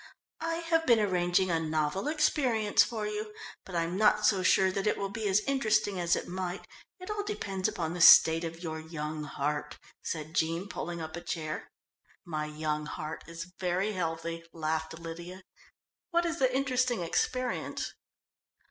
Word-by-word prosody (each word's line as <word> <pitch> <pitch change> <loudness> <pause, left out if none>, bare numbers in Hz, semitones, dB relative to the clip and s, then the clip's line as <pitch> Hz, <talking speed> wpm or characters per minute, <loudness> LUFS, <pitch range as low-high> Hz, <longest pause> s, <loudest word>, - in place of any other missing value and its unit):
"I 330 0 -1
have 330 -1 0
been 235 -2 +6
arranging 180 -2 +2
a 165 - +2
novel 155 - -1
experience 275 -8 +3
for 220 -3 -3
you, 210 0 -4 0.3
but 185 - -9
I'm 170 +2 0
not 210 0 +4
so 195 -3 +4
sure 190 +1 +4
that 195 +2 -1
it - - +2
will 195 -1 -3
be 220 0 -2
as 195 +1 +3
interesting 215 -7 +1
as 175 -1 +2
it - - -4
might 185 0 -4 0.3
it 370 +3 -6
all 420 -1 -1
depends 195 - -2
upon 165 -2 -2
the 175 - -3
state 165 0 +9
of 165 +1 -6
your 160 -1 -4
young 155 -1 -5
heart," 150 +1 -3 0.2
said 155 -1 -4
Jean, 165 +4 0
pulling 175 -4 -5
up 160 0 -6
a 170 - -6
chair. 155 -3 -4 0.6
"My 155 -2 -3
young 150 0 -2
heart 155 +1 -5
is 165 +2 -7
very 185 +3 0
healthy," 165 -2 -3
laughed 160 0 -2
Lydia. 170 +3 -8 0.7
"What 345 0 +2
is 335 0 -2
the 260 -1 +3
interesting 255 -4 +1
experience?" 250 +9 -1
180 Hz, 165 wpm, -30 LUFS, 160-215 Hz, 0.7 s, state